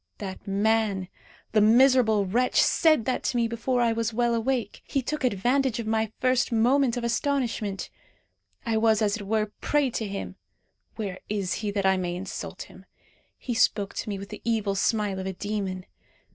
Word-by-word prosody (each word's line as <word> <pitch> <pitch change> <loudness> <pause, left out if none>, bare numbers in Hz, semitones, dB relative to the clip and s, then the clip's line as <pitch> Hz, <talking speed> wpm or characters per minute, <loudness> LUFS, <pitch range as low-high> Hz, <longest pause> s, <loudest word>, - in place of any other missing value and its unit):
That 190 -1 -7
man, 200 -2 +1 0.4
the 215 - +4
miserable 225 -2 +5
wretch! 245 +7 +1
said 310 -9 +4
that 255 - 0
to 245 - 0
me 235 -1 +2
before 240 +2 -1
I 230 -1 +3
was 230 0 -1
well 235 +1 +1
awake. 230 -2 -1
He 275 - -2
took 300 +4 -3
advantage 250 +3 +1
of 230 - -4
my 220 0 0
first 255 -1 +2
moment 245 +2 +3
of 240 - -3
astonishment. 235 -5 -1 0.7
I 225 -1 +1
was 220 -1 +3
as 205 0 +1
it 205 -3 -8
were 215 +1 +2
a 210 - -7
prey 290 -3 +1
to 220 -2 -3
him. 195 0 -6 0.6
Where 195 -4 -5
is 200 -3 -1
he, 210 - -2
that 200 -1 -1
I 190 0 +4
may 175 -1 -2
insult 185 +2 -6
him? - - -16 0.5
He 245 - -4
spoke 205 -3 +1
to 220 - -3
me 200 - -3
with 195 +1 -8
the 210 - -9
evil 220 -3 0
smile 200 -1 0
of 190 - -4
a 190 - -3
demon. 195 -2 -4
220 Hz, 185 wpm, -26 LUFS, 200-240 Hz, 0.7 s, miserable